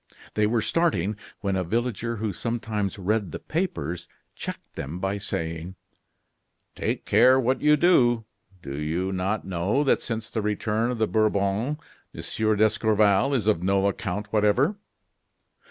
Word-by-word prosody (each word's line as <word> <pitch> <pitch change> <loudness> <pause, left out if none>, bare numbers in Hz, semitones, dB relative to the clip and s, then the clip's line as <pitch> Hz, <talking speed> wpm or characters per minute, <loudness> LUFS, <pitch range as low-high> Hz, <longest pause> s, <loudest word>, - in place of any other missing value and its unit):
They 105 0 +2
were 115 0 +1
starting, 105 - +1 0.3
when 100 -2 0
a 95 - 0
villager 115 +4 -1
who 110 -2 -2
sometimes 110 -2 -2
read 100 0 0
the - - -4
papers, 90 - -3 0.3
checked - - -7
them 75 +5 -5
by 95 +2 -2
saying: 85 -1 -4 1.0
"Take - - -2
care 130 +1 +6
what 130 +1 +1
you 150 0 +5
do. 120 -9 +4 0.4
Do 70 0 -5
you 85 +5 -1
not 95 +3 -1
know 95 +9 0
that 140 - +2
since 115 -2 -4
the 110 - -1
return 105 +2 0
of 125 - -2
the 110 - +2
Bourbons 110 +5 +1 0.4
Monsieur 110 -1 0
d'Escorval 110 +3 +3
is 115 -6 0
of 105 -6 +2
no 95 +1 +2
account 100 +1 -3
whatever? 110 - +3
105 Hz, 145 wpm, -25 LUFS, 95-115 Hz, 1.0 s, care